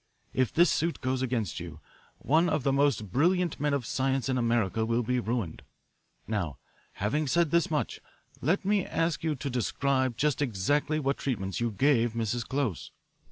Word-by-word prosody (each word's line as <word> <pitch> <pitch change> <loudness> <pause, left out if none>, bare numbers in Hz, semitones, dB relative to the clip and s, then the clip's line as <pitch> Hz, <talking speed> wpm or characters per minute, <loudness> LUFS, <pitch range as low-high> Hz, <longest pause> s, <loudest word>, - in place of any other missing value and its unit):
If 130 -2 +1
this 175 +2 +4
suit 165 +1 0
goes 130 0 -1
against 120 -6 -1
you, 85 -3 -8 0.4
one 160 +7 +2
of 155 -4 0
the 135 - +2
most 135 -8 +1
brilliant 175 - +2
men 145 +1 +1
of 140 -4 -1
science 135 +1 0
in 130 - +1
America 115 -3 +1
will 115 +2 +1
be 125 +2 0
ruined. 115 -8 -3 0.6
Now, 95 - -2 0.4
having 145 +10 -1
said 170 +2 +2
this 170 0 +3
much, 150 -2 -1 0.4
let 180 +8 +1
me 200 -1 +2
ask 165 -2 -1
you 160 -2 0
to 140 +1 -5
describe 130 0 0
just 145 -1 +1
exactly 145 +6 +1
what 140 -1 0
treatments 95 -8 -2
you 120 0 0
gave 120 +1 +2
Mrs. 115 +1 -1
Close." 130 - -2
130 Hz, 170 wpm, -29 LUFS, 115-150 Hz, 0.6 s, this